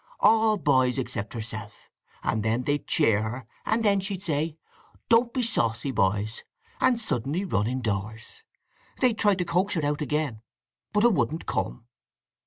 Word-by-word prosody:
All 220 0 +5
boys 130 -6 +2
except 115 -4 -3
herself; 110 -2 -7 0.3
and 110 - 0
then 110 +3 0
they'd 145 +1 -1
cheer 105 -2 +3
her, 115 +3 -4 0.2
and 225 +1 +1
then 200 -1 +4
she'd 190 -1 -4
say, 155 -2 -1 0.5
'Don't 235 +1 +4
be 255 -1 -1
saucy, 120 - 0
boys,' 105 +1 0 0.4
and 255 -2 +3
suddenly 165 - -1
run 105 - 0
indoors. 110 -3 -4 0.6
They'd 240 -4 +2
try 205 -2 +4
to 180 -1 -2
coax 180 +4 +1
her 160 -3 0
out 145 +1 -1
again. 150 -6 -1 0.5
But 210 +1 +2
'a 240 - +7
wouldn't 165 -4 0
come." - - -3
145 Hz, 155 wpm, -26 LUFS, -, 0.6 s, a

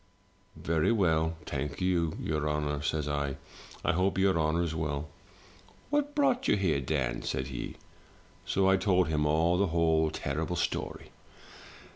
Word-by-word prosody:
'"'Very 80 +4 +1
well, 80 -6 +2
thank 75 -1 -4
your 80 -4 0
honour,' 75 -1 -1
says 75 0 -1
I. 70 -2 -2 0.5
*I - - +4
hope 95 +3 +1
your 95 -1 +3
honour's 80 +1 +1
well.' 75 -2 -3 0.4
" - - -25 0.3
*What 290 0 0
brought 270 -3 +2
you - - +4
here, 85 -8 +1
Dan?' 65 -3 -1
said 65 0 -3
he. 65 - -5 0.7
So 95 0 +1
I 95 0 +5
told 95 -3 +2
him 75 -1 +1
all 85 +4 +2
the 100 - +3
whole 80 -1 +2
terrible - - -3
story. - - -3
80 Hz, 145 wpm, -30 LUFS, 75-95 Hz, 0.7 s, I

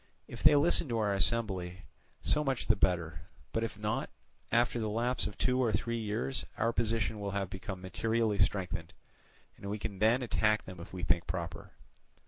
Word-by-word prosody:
If - - -9
they - - +7
listen 155 0 +5
to 115 - 0
our 105 -2 +1 0.2
embassy, 95 -6 -3 0.4
so 150 - +3
much 135 -4 -1
the 110 - +4
better; 85 -5 0 0.3
but 115 - -1
if 110 -2 -4
not, 105 0 -2 0.4
after 120 +1 +2
the 110 -1 -1
lapse 120 +4 0
of 105 - -9
two 125 0 +2
or 115 - +2
three 115 +2 -1
years 110 +5 -2
our 115 +1 +1
position 110 -2 0
will 100 -1 -3
have 95 -1 -3
become 95 -1 -6
materially 110 +3 0
strengthened, 90 -5 0 0.6
and 100 - -7
we 105 - -2
can 100 -2 -5
then 115 +5 +3
attack 110 -2 +1
them 90 -2 -10
if 85 - -10
we 90 -1 -7
think 85 -2 +1
proper. 85 -1 -5
105 Hz, 185 wpm, -32 LUFS, 95-115 Hz, 0.6 s, they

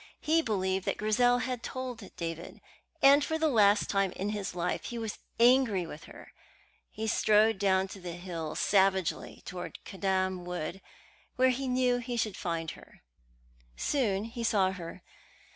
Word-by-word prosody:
He 325 +2 +2
believed 190 - -1
that - - 0
Grizel 245 +4 +3
had 250 -2 -3
told 250 -6 -6
David, 165 0 -6 0.4
and 280 +1 +7
for 320 - -1
the 320 0 +2
last 210 -6 +4
time 195 -2 +1
in 200 +2 -3
his 205 -3 -4
life 175 0 -2
he 240 - -5
was 225 -2 -4 0.2
angry 235 -6 +4
with 155 0 -9
her. - - -13 0.6
He 220 - -5
strode 215 -1 +3
down 190 -1 +3
the 180 -3 -7
hill 170 -3 -5
savagely 190 -3 +1
towards 180 -1 -6
Caddam 190 -1 -1
Wood, 180 +1 -5 0.5
where 260 0 +4
he 265 +2 -3
knew 250 -1 +2
he 245 0 -4
should 215 -4 -1
find 165 -2 -3
her. - - -16 0.7
Soon 210 - 0
he 230 +1 -6
saw 195 -4 +3
her. 175 -3 -8
205 Hz, 155 wpm, -30 LUFS, 185-245 Hz, 0.7 s, and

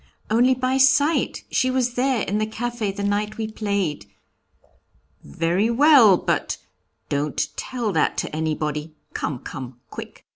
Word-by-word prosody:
'Only 245 +4 +4
by 255 +1 0
sight, 285 +4 +3
she 255 - +2
was 255 -2 0
there 250 -2 +1
in 205 +3 -1
the 215 - 0
café 225 -2 -3
the 200 - -4
night 210 +2 -1
we 220 -1 -2
played.' 200 - -2 1.2
'Very 170 - 0
well; 240 - +6
but - - -1 0.5
don't 145 +1 -1
tell 240 -5 -3
that 160 -4 +1
to - - -3
anybody; 155 0 -2 0.2
come, 145 - -3
come, 125 -1 -8
quick.' - - -9
215 Hz, 140 wpm, -23 LUFS, 160-250 Hz, 1.2 s, well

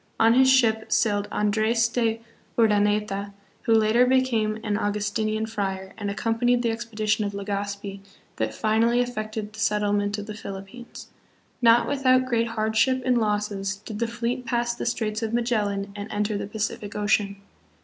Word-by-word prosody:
On 225 +1 +5
his 260 +1 +5
ship 225 -4 +3
sailed 205 -3 +2
Andres 220 +2 +2
de 230 -1 0 0.4
Urdaneta, 210 -2 +1 0.3
who 225 - +4
later 220 +2 +4
became 240 -5 +2
an 210 -2 -1
Augustinian 210 +1 -1
friar 195 -3 -4
and 205 -2 -4
accompanied 235 +4 +1
the 230 - +1
expedition 220 -2 -1
of 200 -1 -3
Legazpi 200 0 -4 0.4
that 110 0 -1
finally 225 - +2
effected 215 -3 -3
the 220 - -11
settlement 205 -1 +1
of 205 - -5
the 215 - -6
Philippines. 200 +3 -9 0.5
Not 235 0 +5
without 255 -2 +3
great 235 -2 +1
hardship 225 +3 +1
and 250 -2 +3
losses 205 -2 -1
did 210 +1 -8
the 235 - 0
fleet 235 +2 -3
pass 240 0 0
the 235 - -4
Straits 220 -2 -1
of 225 0 -1
Magellan 205 -4 -1
and 205 +1 -6
enter 210 0 -1
the 200 - -3
Pacific 210 -1 -4
Ocean. 205 -1 +1
215 Hz, 155 wpm, -25 LUFS, 205-235 Hz, 0.5 s, On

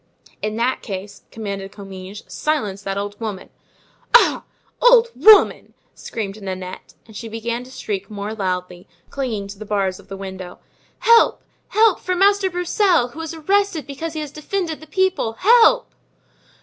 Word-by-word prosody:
"In 215 0 -2
that 240 +3 0
case," 200 -1 -7
commanded 200 -3 -6
Comminges, 195 0 -9
"silence 215 -11 -2
that 195 -1 -4
old 205 0 -4
woman." 210 -4 -5 0.6
"Ah! - - +5 0.4
old 485 -1 +6
woman!" 435 -1 +5 0.2
screamed 215 -2 -6
Nanette. 185 -1 -7
And 220 - -16
she 230 +2 -6
began 230 +2 -4
to - - -14
shriek 200 -6 -5
more 210 0 -5
loudly, 180 -3 -4 0.2
clinging 230 -8 -3
to 200 0 -10
the - - -6
bars 200 -3 -1
of - - -17
the 195 - -7
window: 190 -2 -8 0.4
"Help! 465 -1 +5 0.2
help! 435 -2 +3
for 365 - -2
Master 395 +1 +3
Broussel, 355 - +2
who 310 +6 -9
is 325 0 -6
arrested 380 -1 0
because 285 +4 -6
he 310 - -4
has 295 -2 -6
defended 320 +2 -3
the 315 - -12
people! 375 - 0
Help!" 470 - +4
225 Hz, 155 wpm, -21 LUFS, -, 0.6 s, old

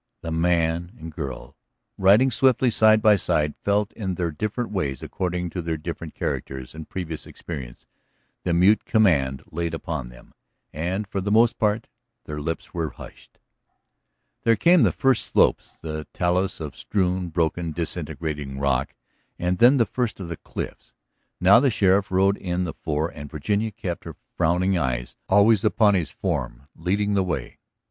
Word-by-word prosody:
The 80 - -5
man 85 +2 0
and 80 -5 -8
girl 70 -5 -7 0.4
riding 105 +8 +5
swiftly 125 0 +3
side 110 0 +5
by 105 -2 +7
side 75 -4 0
felt 100 +1 +1
in 95 -4 -3
their 85 -1 -1
different 110 - -3
ways 70 -10 -2
according 90 -1 -3
to 90 - -3
their 80 -1 -2
different 80 0 -7
characters 65 -1 -4
and 80 -1 -9
previous 80 -5 -5
experience 65 -8 -8 0.6
the 90 - 0
mute 90 +5 +4
command 75 - +2
laid 85 0 -2
upon 80 -6 -4
them, - - -16 0.4
and 90 +7 -2
for 95 0 -3
the 100 - -2
most 115 +3 +4
part 110 +1 +1 0.4
their 75 0 -5
lips 80 +2 -4
were 80 -2 -2
hushed. - - -14 1.0
There 115 - +4
came 170 - +5
the - - +4
first 135 -4 +2
slopes, - - +2
the 80 -1 -5
talus 90 +2 0
of 75 -4 -6
strewn, 90 -2 -1
broken, 80 0 -1
disintegrating 75 -4 -4
rock, 70 -1 0 0.4
and 90 0 -1
then 125 +4 +7
the 115 - +4
first 120 -4 -2
of 90 -3 -6
the 85 - -5
cliffs. - - -7 0.4
Now 95 +4 +7
the 135 +1 +3
sheriff 100 -3 +2
rode 95 +2 +3
in 90 0 -2
the 90 - -4
fore 80 +1 -2
and 75 -3 -9
Virginia 100 +8 -1
kept 95 -5 -5
her - - -7 0.2
frowning 90 +4 +2
eyes - - -2
always 100 +1 +5
upon 105 -1 +4
his 90 -6 0
form - - -4
leading 100 +5 0
the 100 -1 +2
way. 70 -9 -4
90 Hz, 165 wpm, -24 LUFS, 80-105 Hz, 1.0 s, by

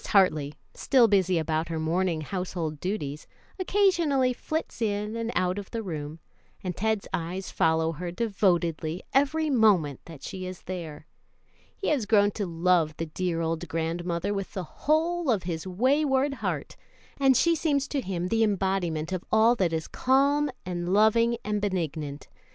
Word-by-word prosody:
Hartley, 155 -7 +3 0.2
still 250 -4 +4
busy 190 -4 +3
about 160 0 -1
her 165 -1 -2
morning 165 +1 0
household 170 -2 -4
duties, 150 -6 -4 0.3
occasionally 340 -10 +2
flits 310 -1 -4
in 210 0 -1
and 230 0 -2
out 180 +2 +1
of 200 - -9
the 230 -1 -4
room, 155 -4 -5 0.5
and 180 -2 -3
Ted's 220 +1 -1
eyes 180 +3 -3
follow 160 0 +2
her 175 +3 -5
devotedly 175 -5 0
every 295 +3 +2
moment 195 - +3
that 155 -5 -12
she 185 +2 -5
is 185 -1 -8
there. 165 -5 -6 0.7
He 390 - -2
has 270 -9 0
grown 205 -1 +4
to 205 -1 -3
love 165 -2 +1
the 165 - -2
dear 165 +1 -2
old 165 +1 -2
grandmother 170 +4 -2
with 195 -1 -4
the 190 - -2
whole 320 - 0
of 215 -6 +2
his 170 0 -4
wayward 270 +7 +2
heart, - - -4 0.4
and 270 -2 +5
she 335 - +4
seems 290 -4 0
to 280 - -1
him 180 -4 -3
the 225 0 +2
embodiment 190 -6 0
of 185 -2 -2
all 220 +2 +5
that 180 -5 +1
is 160 -1 -2
calm 280 +3 +2 0.2
and 175 -1 -3
loving 230 +3 +4
and 210 -1 -1
benignant. 155 -7 -3
185 Hz, 160 wpm, -27 LUFS, 165-230 Hz, 0.7 s, and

